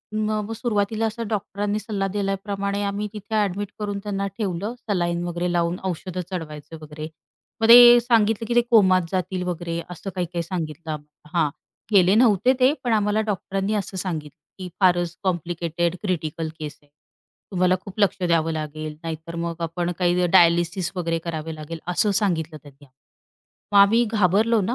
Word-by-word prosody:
म 215 0 0 0.2
म - - -7
सुरुवातीला 220 -1 0
असं 225 +1 -3
डॉक्टरांनी 205 0 -2
सल्ला 205 -3 -2
दिल्याप्रमाणे 200 0 -2
आम्ही 200 +1 -2
तिथे 210 +1 -5
ॲडमिट 205 -1 0
करून 205 -1 -3
त्यांना 200 -1 -2
ठेवलं 200 0 -2 0.2
सलाईन 175 -3 0
वगैरे 175 0 -2
लावून 170 0 0
औषधं 180 +1 -5
चढवायचं 160 -3 -6
वगैरे. 155 0 -7 0.5
मग 225 - +3
ते 240 0 +10
सांगितलं 225 -2 +2
की, 240 - -1
"ते 240 - +6
कोमात 190 -5 +6
जातील 185 0 -2
वगैरे." 170 -1 -3
असं 180 +2 -7
काही-काही 175 -1 -2
सांगितलं 165 -2 -5
आम्हाला. 150 +2 -8
हां, 155 -3 +3 0.4
गेले 190 -1 +5
नव्हते 230 +1 +4
ते 255 +1 +5
पण 240 -2 +1
आम्हाला 210 0 +2
डॉक्टरांनी 195 +1 -2
असं 195 -2 -3
सांगितलं 160 -5 -4 0.2
की, 185 - -5
"फारच 175 -2 +2
कॉम्प्लिकेटेड 175 -1 -1
क्रिटिकल 165 -4 -2
केस 150 -1 -6
आहे. 145 - -29 0.6
तुम्हाला 185 -1 +3
खूप 195 +1 -10
लक्ष 200 -2 +3
द्यावं 165 -1 +2
लागेल, 155 0 -5
नाहीतर 165 +1 -6
मग 170 0 -5
आपण 170 +1 -2
काही 180 0 +2
डायलिसिस 170 0 +3
वगैरे 165 -2 -1
करावे 160 -1 -4
लागेल." 155 +2 -7
असं 180 +4 +2
सांगितलं 165 -5 -1
त्यांनी. 145 0 -16 0.9
मग 200 - +6
आम्ही 215 +4 +6
घाबरलो 215 +3 +3
ना 205 +5 -1
185 Hz, 160 wpm, -23 LUFS, 170-205 Hz, 0.9 s, ते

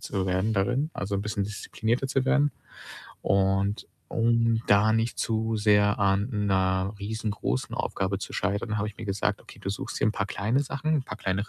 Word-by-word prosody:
zu 95 -2 -2
werden 95 +4 +1
darin, 125 +10 +1
also, 100 0 -3
'n 100 - 0
bisschen 105 -1 -1
disziplinierter 110 +4 -2
zu 135 -1 +1
werden 145 +2 +3 0.7
und 95 +1 +1 0.2
um 115 0 +2
da 105 +2 +5
nicht 115 +1 0
zu 110 0 0
sehr 105 -1 +4
an 100 +3 +2
'ner 95 -1 +1
riesengroßen 105 - -2
Aufgabe 95 0 -1
zu - - -7
scheitern, 100 +2 -1
habe 105 - -1
ich 105 - -10
mir 115 - -7
gesagt: 100 0 -1
„Okay, - - -14
du 95 - -3
suchst 100 - -5
dir 110 - +3
paar 100 -2 -2
kleine 105 +6 0
Sachen, 145 +1 -1
paar - - -6
kleine 100 +2 -1
105 Hz, 180 wpm, -27 LUFS, 100-115 Hz, 0.7 s, da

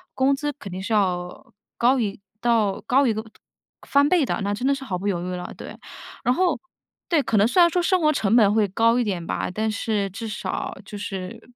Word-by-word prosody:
工 265 +1 +3
资 295 +2 -2
肯 255 -9 -10
定 185 +1 -5
是 205 - -5
要 180 -4 -1 0.2
高 255 +3 +3
于 205 -4 -2 0.2
到 225 -4 +1
高 270 +4 +3
于 - - +3
一 - - 0
个 220 +1 -4 0.6
翻 280 +1 +4
倍 350 -2 +4
的， - - -2
那 200 +1 -1
真 245 +6 -2
的 280 - +3
是 270 - -8
毫 195 -9 -3
不 200 - -3
犹 175 -4 -1
豫 180 - -4
了， 180 0 -6
对。 - - -9 0.5
然 250 - +2
后， 360 0 +1 0.5
对， 320 -5 +3
可 220 - 0
能 205 - +5
虽 305 - +1
然 345 - +8
说 355 +1 +1
生 370 +1 +2
活 305 -1 +4
成 220 -6 +1
本 210 -4 +5
会 215 -1 +3
高 230 +5 +2
一 - - +2
点 185 -6 -3
吧， - - -2
但 220 +3 -1
是 215 -2 -1
至 225 +4 -6
少 210 - -4
就 205 - -8
是， 190 -2 -6
220 Hz, 255 characters per minute, -23 LUFS, 200-270 Hz, 0.6 s, 然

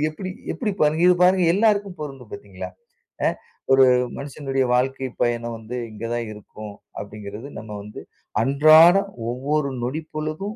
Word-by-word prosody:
எப்டி 185 +4 -6 0.2
எப்டி 220 -5 -2
பாருங்க, 155 +1 +3
இது 180 - +6
பாருங்க 185 0 +5
எல்லாருக்கும் 205 -4 +1
பொருந்தும், 140 -3 -8
பாத்தீங்களா? 410 - -8 0.6
ஆ - - +5 0.4
ஒரு 135 0 +7 0.3
மனுஷனுடைய 135 -1 -2
வாழ்க்கை 130 +1 0
பயணம் 120 -1 0
வந்து 110 +2 -8 0.2
இங்கதான் 115 +2 -4
இருக்கும் 105 0 -10 0.3
அப்டிங்கிறது 105 +3 -8
நம்ம 110 0 -9
வந்து 105 +1 -10 0.4
அன்றாடம் 155 +9 +6 0.2
ஒவ்வொரு 140 +3 -1
நொடிப்பொழுதும், 155 - -4
140 Hz, 125 wpm, -23 LUFS, 120-170 Hz, 0.6 s, ஒரு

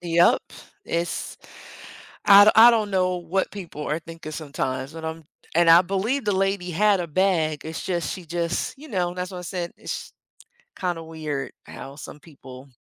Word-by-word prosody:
Yup. 170 0 +3 0.4
It's 170 +1 -3 0.9
I 200 0 +9
don 215 - +6
I 230 +2 +10
don't 220 -3 0
know 185 -1 +1
what 175 +2 -2
people 170 -7 -7
are 155 - -1
thinking 165 -2 -10
sometimes 140 -3 -4
but 165 -1 -8
I'm, 160 0 -5 0.3
and 170 +1 +4
I 165 +2 +8
believe 195 +9 -1
the 205 - +1
lady 195 -1 0
had 200 +3 +3
a 175 - -3
bag, 160 -3 +1
it's 160 0 -5
just, 175 -3 -2
she 185 - -8
just, 170 +1 -2
you 305 +3 -12
know, 180 -6 -1
that's 180 0 -4
why 185 - -7
I - - -6
said, 175 -1 -4
it's - - -6 0.7
kinda 175 -3 -2
weird 155 -4 -5
how 135 +1 -10
some 150 - -10
people 135 -3 -13
175 Hz, 180 wpm, -24 LUFS, 160-190 Hz, 0.9 s, I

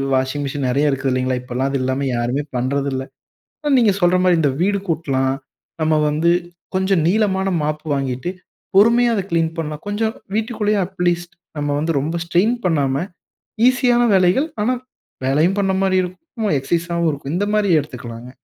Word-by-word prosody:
Washing 130 +2 -1
machine 140 -1 -2
நிறைய 140 +4 +2
இருக்கிறதில்லீங்களா? 130 -1 0
இப்பல்லாம் 125 +2 -2
அது 135 - 0
இல்லாம 130 +2 -1
யாருமே 125 +5 -1
பண்றதில்ல. 135 +1 -1 0.8
நீங்க 225 -5 +4
சொல்ற 175 0 +4
மாரி 180 -2 +4
இந்த 145 -3 +3
வீடு 200 +1 +2
கூட்டலாம். 135 -5 0 0.5
நாம 155 0 +3
வந்து 160 +3 +2 0.5
கொஞ்சம் 190 -2 +2
நீளமான 195 -1 +1
மாப்பு 155 +1 -3
வாங்கிட்டு 135 +3 -2 0.5
பொறுமையா 235 +4 +5
அதை 200 - 0
கிளீன் 165 -1 +1
பண்ணலாம். 155 -2 -4
கொஞ்சம் 220 +2 -1 0.2
வீட்டுக்குள்ளேயே 215 -2 0
அட்லீஸ்ட் 175 -2 -2 0.2
நம்ம 145 0 -1
வந்து 160 +3 0
ரொம்ப 160 +5 -2
ஸ்ட்ரெயின் 185 +8 +2
பண்ணாம 145 -2 +1 0.6
ஈசியான 245 -1 +3
வேலைகள் 185 - +3 0.2
ஆனா 250 +4 +1 0.5
வேலையும் 155 +9 +2
பண்ண 195 -1 +1
மாரி 190 -1 +2
இருக்கும். 215 - -4
எக்ஸைஸாவும் 170 +3 0
இருக்கும். 140 0 -5
இந்த 200 +3 +1
மாரி 210 -2 +2
எடுத்துக்கலாங்க. 125 -4 -8
165 Hz, 145 wpm, -20 LUFS, 135-195 Hz, 0.8 s, பொறுமையா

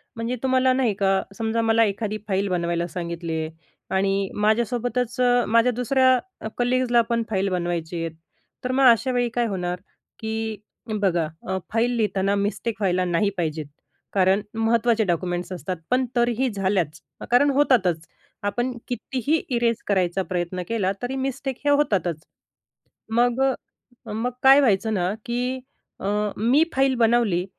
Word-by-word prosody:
म्हणजे 230 +2 -2
तुम्हाला 260 0 +3
नाही 255 -4 +1
का, 195 -1 +2
समजा 225 +2 -1
मला 225 0 +4
एखादी 210 +1 -2
फाईल 195 0 0
बनवायला 170 -1 -1
सांगितली 170 -1 -5
आहे 155 - -4 0.5
आणि 195 0 +1
माझ्यासोबतच 235 +3 0
अ, 245 -1 +4
माझ्या 230 +2 +4
दुसऱ्या 260 +2 +3 0.3
अ, - - -4
कलीग्जला 245 -1 +3
पण 230 -1 +1
फाईल 195 -2 0
बनवायचे 175 -2 -2
आहेत, 165 -1 -4 0.5
तर 255 - -1
मग 265 +1 +3
अशावेळी 245 +1 +1
काय 240 -1 +2
होणार 180 -3 -3 0.4
की 220 0 -3 0.4
बघा 175 -5 +1 0.2
अ, 190 0 -1 0.2
फाईल 230 +2 +2
लिहिताना 200 -2 +1
मिस्टेक 205 +3 -2
व्हायला 185 -2 +1
नाही 175 +3 +1
पाहिजेत, 155 -3 -2 0.5
कारण 190 +1 +3
महत्त्वाचे 225 0 +2
डॉक्युमेंट्स 175 0 -2
असतात, 185 +1 -4
पण 255 +1 +3
तरीही 240 +2 +2
झाल्याच, 190 -6 -1 0.3
कारण 250 +4 +5
होतातच. 220 - +2 0.4
आपण 240 +5 -1 0.2
कितीही 265 +5 -1
इरेज 235 -2 +1
करायचा 190 -1 +1
प्रयत्न 180 -1 -3
केला 210 -5 0
तरी 250 +2 -2
मिस्टेक 265 0 -3
हे - - +3
होतातच. 200 - +1 0.9
मग 240 +2 +2
अ, 250 -3 -4
मग 230 +3 -1
काय 270 +1 +8
व्हायचं 220 -3 +2
ना 185 -1 0
की 250 +2 -2 0.4
अ, - - -6 0.3
मी 245 +8 +4
फाईल 270 0 +3
बनवली, 225 -6 +2
220 Hz, 145 wpm, -24 LUFS, 185-245 Hz, 0.9 s, काय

